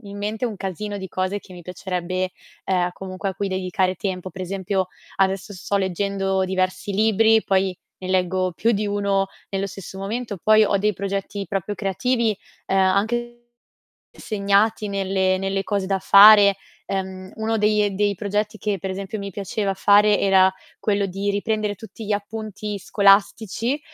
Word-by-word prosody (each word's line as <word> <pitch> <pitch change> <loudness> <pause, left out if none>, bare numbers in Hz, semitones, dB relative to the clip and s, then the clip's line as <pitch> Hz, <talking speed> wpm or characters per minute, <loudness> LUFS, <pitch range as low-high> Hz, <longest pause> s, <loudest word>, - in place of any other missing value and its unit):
in 200 0 -9
mente 215 +4 -2
un 220 - -5
calzino 200 +2 -4
di 190 -1 -6
cose 185 +3 -2
che 190 - -15
mi 180 - -10
piacerebbe, 185 +1 -3 0.4
uhm, 180 -2 +1
comunque 190 +1 -5
a - - -9
cui 200 +1 -2
dedicare 185 0 -1
tempo. 185 -1 -4
Per 185 - -10
esempio, 190 +1 -2 0.3
adesso 195 +1 0
sto 200 +1 -2
leggendo 195 0 0
diversi 185 +1 -1
libri, 220 +2 +4
poi 190 -1 +1 0.2
ne 185 - -7
leggo 185 0 +1
più 225 +7 +1
di 210 -1 -1
1 200 -1 0 0.2
nello 195 0 -1
stesso 190 0 -9
momento, 215 +2 -4
poi 215 0 +6
ho 200 - +2
dei 210 +1 +1
progetti 200 +1 -4
proprio 200 +1 -2
creativi, 220 +3 0 0.3
uhm, 195 - +1
anche 220 +6 +1 0.8
segnati 210 +1 +1
nelle 190 -1 0
nelle 195 +1 -2
cose 200 -2 -1
da 195 0 0
fare, 200 0 +8 0.3
ehm, 190 -1 -4
uno 225 0 -1
dei 210 0 +3
e - - +1
dei 200 +1 0
progetti 210 +2 -2
che, 205 -1 -2
per 190 - -4
esempio, 195 +3 -5
mi 200 0 -5
piaceva 195 +1 -2
fare 205 +2 +5
era 190 -1 +5 0.3
quello 200 -1 +1
di 195 +2 -3
riprendere 210 +1 -1
tutti 220 +2 -11
gli 205 - 0
appunti 210 0 -5
scolastici, 210 +6 +2
200 Hz, 165 wpm, -22 LUFS, 190-210 Hz, 0.8 s, fare